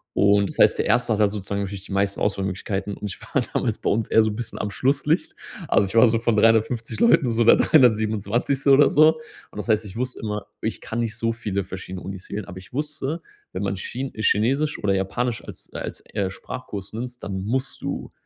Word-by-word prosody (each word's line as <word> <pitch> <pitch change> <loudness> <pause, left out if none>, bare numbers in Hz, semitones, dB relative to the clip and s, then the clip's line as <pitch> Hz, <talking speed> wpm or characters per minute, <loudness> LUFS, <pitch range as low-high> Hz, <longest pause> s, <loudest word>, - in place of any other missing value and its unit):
Und 100 0 +4
das - - -9
heißt, - - +5
der - - 0
erste 120 -2 +2
hat 110 - 0
halt 105 -1 +4
sozusagen 100 -1 -3
natürlich 100 -1 -5
die - - -7
meisten 100 0 0
Auswahlmöglichkeiten 100 0 -2
und 105 - -5
ich 95 - -8
war - - -1
damals - - 0
bei - - -1
uns 110 +1 +1
eher 110 - +5
so 110 - +1
'n - - -6
bisschen 115 0 -5
am 105 - -2
"Schlusslicht". 140 - 0 0.3
Also, 100 - +3
ich 95 - -5
war 115 - +8
so 115 0 +2
von 115 -1 +1
350 115 +1 +2
Leuten 165 - +4
so 115 0 +2
der - - +8
327. 120 +1 +3
oder 140 +1 +7
so. 155 +1 +6 0.4
Und - - -19
das 105 - -5
heißt, 110 0 +2
ich 100 - -9
wusste 125 +1 -3
immer, 105 -1 -4
ich - - -3
kann 115 - -4
nicht 110 -2 -2
so 115 0 0
viele 100 -4 -3
verschiedene 95 0 -7
Unis 95 -1 -8
wählen, 105 - -4
aber 90 +1 -10
ich 95 - -16
wusste, 150 +2 -3 0.3
wenn 95 - -3
man 95 0 -1
Chin 130 +7 -5
Chinesisch 130 +8 +1
oder 100 -1 +2
Japanisch 115 +5 -2
als - - -11
als, - - -6
äh, 100 -3 0
Sprachkurs 100 0 -7
nimmst, 120 +2 -6
dann 95 -1 -4
musst 130 +4 -2
du - - -4
110 Hz, 220 wpm, -23 LUFS, 100-125 Hz, 0.4 s, war